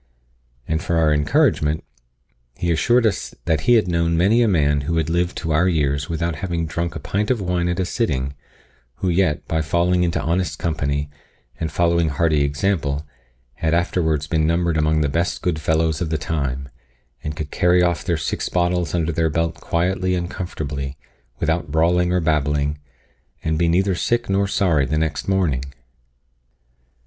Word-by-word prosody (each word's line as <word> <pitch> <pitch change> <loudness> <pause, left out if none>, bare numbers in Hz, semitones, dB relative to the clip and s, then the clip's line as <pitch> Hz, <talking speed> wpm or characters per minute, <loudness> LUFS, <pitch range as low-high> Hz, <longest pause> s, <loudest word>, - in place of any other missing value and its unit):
And 80 +1 0
for 85 -2 -1
our 80 -2 +3
encouragement, 75 +1 +2 0.7
he 85 - 0
assured 120 +10 +3
us 105 -4 -1
that 80 -4 +1
he 120 - +7
had 110 -4 +3
known 85 -1 +1
many 100 +8 +4
a 115 - +4
man 75 -7 +2
who 85 +4 -1
had 80 0 0
lived 85 +1 0
to 80 - -3
our 80 +4 +3
years 75 -4 0
without 85 -1 -2
having 85 -2 -2
drunk 85 +1 -3
a - - -4
pint 100 +8 -2
of 125 -3 +1
wine 90 -2 0
at 90 - -1
a 95 - +1
sitting, 70 - -1 0.6
who 95 - -2
yet, 85 -4 +1
by 80 -1 0
falling 85 +3 +1
into 85 -1 +1
honest 85 -3 -1
company, 70 -4 -2 0.5
and 80 - -2
following 85 -1 +2
hearty 75 +1 +1
example, 75 -1 -1 0.5
had 80 0 +1
afterwards 80 -4 0
been 80 +1 +1
numbered 85 0 +1
among 80 0 +2
the 75 - +2
best 85 +5 -1
good 80 -3 -1
fellows 80 +1 +1
of 85 - -1
the 80 - 0
time, 70 -4 -3 0.6
and 75 0 -4
could 75 -1 -5
carry 90 -1 +3
off 85 -3 0
their 85 - 0
six - - -2
bottles 90 -2 0
under 85 -1 0
their 80 0 +1
belt 80 +1 0
quietly 90 +2 -1
and 85 0 -3
comfortably, 70 -6 -5 0.4
without 80 -1 -1
brawling 90 +3 +2
or 90 - +2
babbling, 75 -2 0 0.6
and 80 0 0
be 85 - +3
neither 95 +3 +2
sick 120 +4 0
nor 100 +1 +2
sorry 85 -8 +2
the 75 - 0
next 75 -1 -1
morning. 90 -10 +1
85 Hz, 175 wpm, -21 LUFS, 75-90 Hz, 0.7 s, he